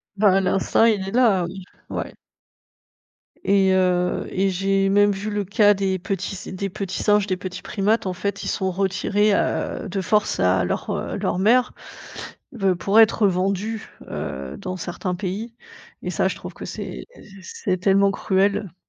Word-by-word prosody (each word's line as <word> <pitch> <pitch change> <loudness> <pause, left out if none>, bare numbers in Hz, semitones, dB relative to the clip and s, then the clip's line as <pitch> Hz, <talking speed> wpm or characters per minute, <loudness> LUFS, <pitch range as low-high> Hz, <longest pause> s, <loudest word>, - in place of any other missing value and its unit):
Bah 195 -2 +4
l'instinct 195 +3 +2
il 205 -4 +2
est - - -4
là, 220 -7 +3
oui, 185 +2 -8 0.3
ouais. - - -4 1.3
Et 195 -1 +3
heu, 180 -1 +1
et 195 +1 +1
j'ai 195 +1 +1
même 205 +1 +4
vu 200 +2 -4
le 205 -1 -1
cas 205 +1 +4
des 190 -1 -1
petits 195 +1 -3
s 185 - -9
des 195 +1 -4
petits 185 0 -4
singes, 210 -1 +3
des 185 -1 -1
petits 185 0 -7
primates. 210 +1 0
En 185 - -1
fait, 200 +2 -3
ils - - -4
sont 190 -2 -1
retirés, 195 +2 +1
heu, - - -1
de 195 +1 -2
force 210 +2 +1
à 90 +1 +3
leur, - - -3
heu, - - -3
leur 175 - -1
mère, 245 +5 +3 0.8
b 195 -6 +1
pour 200 +5 +3
être 220 -1 +5
vendus, 195 +4 -1 0.2
heu, 65 +1 -5
dans 185 0 -5
certains 180 +1 -4
pays. 205 +5 -4 0.5
Et - - -3
ça, - - +1
je - - -4
trouve - - -9
que - - -9
c'est - - -6 0.4
c'est 185 +1 -3
tellement 195 +2 +3
cruel. 195 -1 0
195 Hz, 170 wpm, -22 LUFS, 185-205 Hz, 1.3 s, être